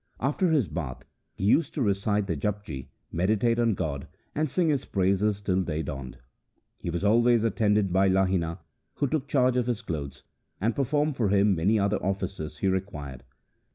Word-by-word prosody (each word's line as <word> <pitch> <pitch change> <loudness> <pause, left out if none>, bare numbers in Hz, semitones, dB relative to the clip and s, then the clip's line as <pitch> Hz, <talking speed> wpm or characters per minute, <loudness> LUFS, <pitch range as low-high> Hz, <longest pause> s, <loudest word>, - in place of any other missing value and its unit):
After 150 +8 +1
his 145 - +2
bath, 70 -8 -5 0.3
he - - -6
used 145 +9 +3
to 145 - -1
recite 100 0 +1
the 90 -4 -2
Japji, 75 -5 -4 0.2
meditate 110 +6 +1
on 115 -3 +2
God, 70 -3 -3 0.3
and 155 0 0
sing 170 +4 +1
His 140 -4 +1
praises 100 +2 +1
till 95 -2 +1
day 80 -3 -2
dawned. 70 -3 -6 0.6
He - - -4
was 85 +2 -2
always 115 +2 +4
attended 105 -3 +2
by 95 +1 +4
Lahina, 95 -3 +1 0.4
who - - 0
took 140 0 -1
charge 130 -3 +2
of 125 -1 +1
his 120 -4 -2
clothes, 70 -5 -5 0.4
and 110 +3 0
performed 145 +1 0
for 110 -5 +1
him 100 -2 +3
any 100 +7 +3
other 100 0 0
offices 95 -5 -3
he 95 - 0
required. 75 -9 -3
100 Hz, 175 wpm, -27 LUFS, 85-120 Hz, 0.6 s, always